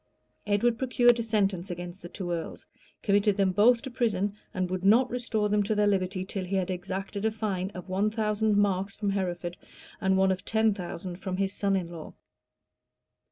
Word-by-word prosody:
Edward 225 +3 +2
procured 245 -2 +4
a - - +1
sentence 200 -4 0
against 175 +1 -6
the 175 - -9
two 175 -1 -5
earls, 170 -1 -4 0.4
committed 205 0 +3
them 195 -2 +3
both 230 +5 +4
to 265 - -6
prison, 205 -5 0 0.2
and 185 -3 -1
would 185 0 -3
not 230 +6 +5
restore 230 -3 0
them 210 0 +2
to 210 +2 0
their 210 0 +3
liberty, 185 -2 0
till 190 0 -4
he 185 +2 -3
had 190 -1 0
exacted 190 +2 -4
a 220 - +3
fine 205 -4 -2
of 180 - -7
one 195 +3 +1
thousand 215 -1 +1
marks 200 -1 +1
from 205 -2 -1
Hereford, 175 -3 -3 0.4
and 190 -1 +3
one 190 0 +4
of 185 -1 -2
ten 220 -1 +2
thousand 180 -1 -6
from 185 -1 -4
his 195 0 0
son 200 -1 +1
in 175 -3 -2
law. 165 -3 -9
195 Hz, 195 wpm, -28 LUFS, 185-215 Hz, 0.4 s, not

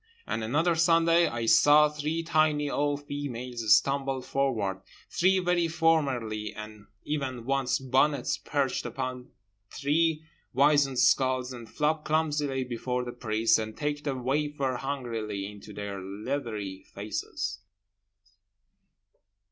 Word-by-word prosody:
And 115 - -3
another 160 +10 +2
Sunday 165 +1 +4
I 115 -1 -3
saw 145 +7 +6
three 150 +2 -3
tiny 155 -2 +2
old 145 0 -1
females 125 -5 +1
stumble 135 -1 -1
forward, 110 -10 -1 0.3
three 190 +2 +3
very 180 -2 +1
formerly 135 -10 0
and 105 -1 -10 0.2
even 130 -5 -3
once 135 -1 +1
bonnets 135 +1 +1
perched 140 -3 -1
upon 130 -1 -5 0.4
three 155 +2 0 0.3
wizened 140 -1 +4
skulls, 130 0 +2
and 120 -3 -10
flop 150 +3 0
clumsily 150 -4 0
before 125 0 -3
the 120 - -5
priest, 115 -2 +1
and 110 0 -5
take 145 0 -2
the 140 -3 -2
wafer 135 0 -1
hungrily 115 -7 -4
into 105 0 -10
their 100 -1 -6
leathery 105 -1 -4
faces. 100 -1 -4
135 Hz, 115 wpm, -28 LUFS, 115-150 Hz, 0.4 s, saw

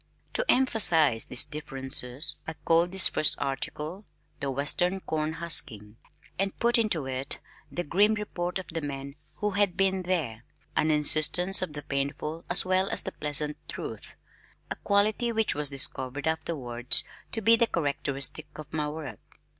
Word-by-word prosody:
To - - +1
emphasize 165 - +3
these 125 - +1
differences 135 -3 +2
I 160 - -4
called 165 +2 +1
this 190 -1 +6
first 155 - +3
article 150 +7 -5 0.3
"The 140 - -3
Western 155 +7 0
Corn 155 -1 -3
Husking," 115 -10 -1 0.4
and 195 0 -2
put 235 0 +2
into 195 -11 0
it 130 +1 +1 0.3
the 175 - -3
grim 205 +7 +2
report 180 -4 -4
of 190 - -6
the 165 -1 -4
man 140 -1 -6 0.2
who 210 0 -2
had 200 -2 +1
"been 190 -1 +1
there," 155 -12 -3 0.3
an 155 - +2
insistence 155 +5 +1
on 180 -5 -4
the 145 -1 -7
painful 145 +3 -4
as 175 +2 +4
well 185 +1 +1
as - - -1
the 190 - -5
pleasant 150 -1 -2
truth, - - -7 0.6
a - - -1
quality 215 +4 +1
which 220 -1 +3
was 150 -1 -1
discovered 135 0 -1
afterwards 135 -7 +4 0.3
to 225 - -3
be 230 +2 +7
characteristic 150 - -1
of 155 - -11
my 150 -1 -1
work. 150 -8 -8
160 Hz, 155 wpm, -27 LUFS, 140-190 Hz, 0.6 s, be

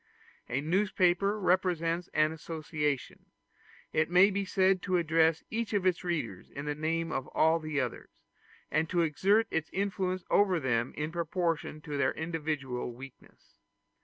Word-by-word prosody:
A 130 +3 -1
newspaper 190 +3 +2
represents 180 -2 +1
an 155 0 +3
association; 155 -3 -3 0.7
it 155 +1 +2
may 185 +3 +6
be 200 0 -1
said 190 -1 +2
to 185 0 +1
address 160 -1 +2
each 225 0 -2
of 200 -3 +1
its 180 -2 +1
readers 150 - -3
in 140 +1 -7
the 150 - -1
name 165 +2 -1
of 135 -3 -3
all 160 +1 +3
the 155 -2 -2
others, 125 -3 -5 0.5
and 155 +2 +1
to 175 -2 +2
exert 195 +8 +3
its 160 -1 -1
influence 190 -2 -1
over 190 -4 +4
them 120 -3 0
in 150 +1 -2
proportion 165 -2 -2
to 150 -2 -5
their 130 -1 +2
individual 150 -7 -3
weakness. 135 +1 -14
165 Hz, 150 wpm, -30 LUFS, 150-185 Hz, 0.7 s, may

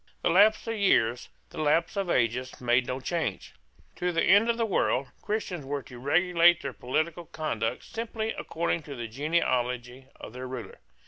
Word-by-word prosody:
The - - +3
lapse 205 +5 +5
of 225 - -2
years, 125 - +2 0.2
the - - -8
lapse 165 +4 +2
of 195 -3 -1
ages, 125 -1 0
made 120 0 +2
no 130 +1 -3
change. 160 - -3 0.4
To 180 0 0
the 165 - +1
end 205 +5 +5
of 230 - +1
the 230 - +1
world, 140 - 0
Christians 205 -6 -3
were 140 0 -4
to 125 - -12
regulate 175 +4 +4
their 135 -2 -4
political 160 +6 -2
conduct 115 -8 -3
simply 225 -1 -4
according 165 0 -2
to 140 - -5
the 120 -2 -5
genealogy 125 -2 -1
of - - -10
their 130 +1 -6
ruler. 125 -2 -7
155 Hz, 175 wpm, -28 LUFS, 125-180 Hz, 0.4 s, lapse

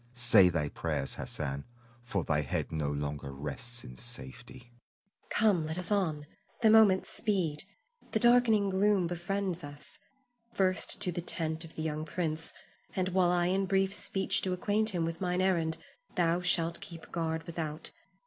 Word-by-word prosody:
Say 115 -7 +6
thy 80 -4 -1
prayers, 70 - -3
Hassan, 70 -2 -4 0.4
for 100 -7 -2
thy 75 -1 +1
head 70 - -3
no 75 -3 -1
longer 70 -1 -4
rests 75 - -6
in 65 - -10
safety. 65 - -8
Zuleika. - - -28 0.5
Come, 205 -7 +3
let 160 +2 -3
us 180 +2 +1
on! 160 -8 0 0.4
The 220 - +7
moments 215 -4 +5
speed. 185 -8 -1 0.5
The 220 - +1
darkening 230 -4 +4
gloom 195 -1 +3
befriends 180 +1 -2
us. 145 0 -8 0.6
First 185 -3 +2
to 180 - 0
the 175 0 -3
tent 160 -1 -1
of 165 - -13
the 155 - -4
young 155 0 -2
prince, 160 -1 -2 0.4
and 185 -1 0
while 185 -1 +3
I 175 0 +2
in 190 +2 +1
brief 195 0 +2
speech 195 -1 +1
do 185 - -1
acquaint 210 +4 +1
him 175 -5 0
with 165 +1 -5
mine 180 -1 0
errand, 170 -4 +1 0.4
thou 175 -1 +2
shalt 170 -1 +3
keep 170 -5 -10
guard 160 -1 -2
without. 160 -2 -5
170 Hz, 165 wpm, -31 LUFS, 145-190 Hz, 0.6 s, The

